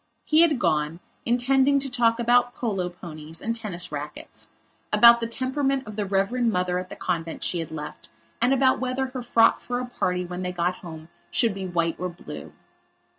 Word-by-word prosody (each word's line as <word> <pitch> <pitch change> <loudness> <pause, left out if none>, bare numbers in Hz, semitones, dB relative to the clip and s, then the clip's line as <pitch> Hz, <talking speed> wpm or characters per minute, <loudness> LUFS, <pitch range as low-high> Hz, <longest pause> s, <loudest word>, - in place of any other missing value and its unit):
He 310 +1 +5
had 320 -5 +4
gone, 155 -6 0 0.3
intending 265 +3 +3
to 275 0 0
talk 240 -3 +2
about 245 +1 +3
polo 195 -7 -2
ponies, 165 -2 -9
and 230 - -2
tennis 205 -8 -5
racquets; 150 0 -7 0.4
about 235 0 +8
the 230 - -2
temperament 265 +2 -1
of 210 - -8
the 205 -1 -2
reverend 200 +5 +1
Mother 180 -1 0
at 185 0 -7
the - - -8
convent 165 -2 -3
she 175 - +1
had 165 - -4
left 150 -1 -8 0.3
and 245 +2 +4
about 265 -1 +3
whether 255 +1 -1
her 255 -1 -5
frock 230 -1 +4
for 245 0 -3
a 250 - -3
party 180 -7 -2
when 180 +1 -6
they 180 0 -2
got 180 +1 -1
home 160 -2 -10 0.2
should 230 -4 +2
be 190 -1 -5
white 170 -2 -1
or 180 +1 -2
blue. 175 - -9
215 Hz, 190 wpm, -25 LUFS, 175-245 Hz, 0.4 s, about